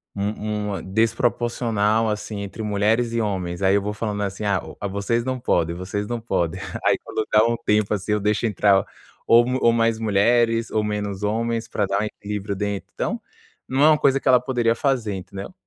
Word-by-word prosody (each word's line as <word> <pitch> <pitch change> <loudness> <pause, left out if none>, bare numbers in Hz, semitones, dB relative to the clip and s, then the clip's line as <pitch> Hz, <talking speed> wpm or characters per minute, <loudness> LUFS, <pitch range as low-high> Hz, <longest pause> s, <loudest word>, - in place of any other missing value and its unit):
um 105 +1 -2
uma 100 -1 -4
desproporcional 115 +1 +1
assim, 105 -1 -4
entre 100 +2 -7
mulheres 110 +3 +1
e 115 - +1
homens, 95 -4 -3
aí 95 0 +4
eu 100 - +2
vou 105 +1 -3
falando 105 -1 -3
assim: 100 +1 -4
"Ah, 100 -3 +1
o 100 - -6
vocês 100 +4 -1
não 130 -1 -2
podem, 85 -8 0
vocês 100 +3 -4
não 120 +1 -3
podem". 85 -8 -1 0.2
Aí - - +4
quando 110 - -3
dá 105 0 +6
um 115 0 +1
tempo 105 -2 +1
assim, 105 +1 -1
eu 105 - +1
deixo 105 +3 0
entrar 100 -2 +3 0.4
ou 120 +1 +6 0.2
ou 115 - +5
mais 115 -1 +1
mulheres 115 +2 +2
ou 110 - +1
menos 105 -1 -3
homens 115 +2 -1
pra 105 -3 -1
dar 100 +1 0
um - - 0
equilíbrio 105 -1 -5
dentro. 100 0 -3
Então, - - -3 0.5
não 135 +2 +1
é - - +8
uma 155 - +5
coisa 135 0 +3
que - - -6
ela 125 -1 +6
poderia 120 -3 +1
fazer, 130 -8 0
entendeu? 95 - -8
105 Hz, 200 wpm, -23 LUFS, 100-115 Hz, 0.5 s, é